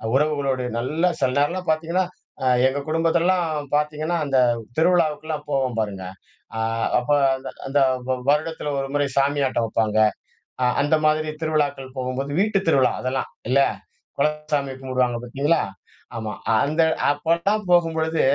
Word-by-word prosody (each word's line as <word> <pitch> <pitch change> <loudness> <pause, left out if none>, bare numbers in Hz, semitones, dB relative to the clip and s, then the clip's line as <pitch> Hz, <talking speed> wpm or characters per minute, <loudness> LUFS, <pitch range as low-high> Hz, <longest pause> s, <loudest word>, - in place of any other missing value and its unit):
உறவுகளோடு 140 -3 +1
நல்ல 150 +8 0
சில 130 - +2
நேரம்லாம் 175 +6 0
பார்த்தீங்கன்னா, 165 +4 0 0.4
அ - - 0 0.2
எங்கள் 140 +2 -3
குடும்பத்தெல்லாம் 165 -2 +1
பார்த்தீங்கன்னா, 150 +3 0
அந்த 135 -2 +1 0.4
திருவிழாவுக்கெல்லாம் 155 -3 +1
போவோம் 130 -4 0
பாருங்க. 100 -3 -3 0.5
அ - - -2 0.4
அப்ப 125 - -8 0.3
அந்த 130 0 -7 0.2
அந்த 140 +2 +1 0.3
வ - - +3 0.2
வருடத்தில 150 +1 0
ஒரு 135 - -2
முறை 145 0 +1
சாமி 140 +1 +2
ஆட்டம் 120 -3 0
வப்பாங்க. 110 -1 0 0.7
அ - - +3 0.2
அந்த 145 +2 +3
மாதிரி 155 0 +1
திருவிழாக்கள் 145 -4 -1
போகும்போது, 130 +2 -3
வீட்டுத் 200 -3 0
திருவிழா 135 -5 +3
அதெல்லாம். 130 +1 -2 0.2
இல்ல. 140 - +4 0.6
குலசாமி 150 -1 0
கும்பிடுவாங்க 125 -2 0
பார்த்தீங்களா! 140 +7 +1 0.6
ஆமா. 110 -2 -4 0.3
அந்த 155 +3 +2 0.3
அப்பல்லாம் 170 +8 0
போகும்பொழுது, 160 -2 +2
145 Hz, 130 wpm, -23 LUFS, 135-160 Hz, 0.7 s, இல்ல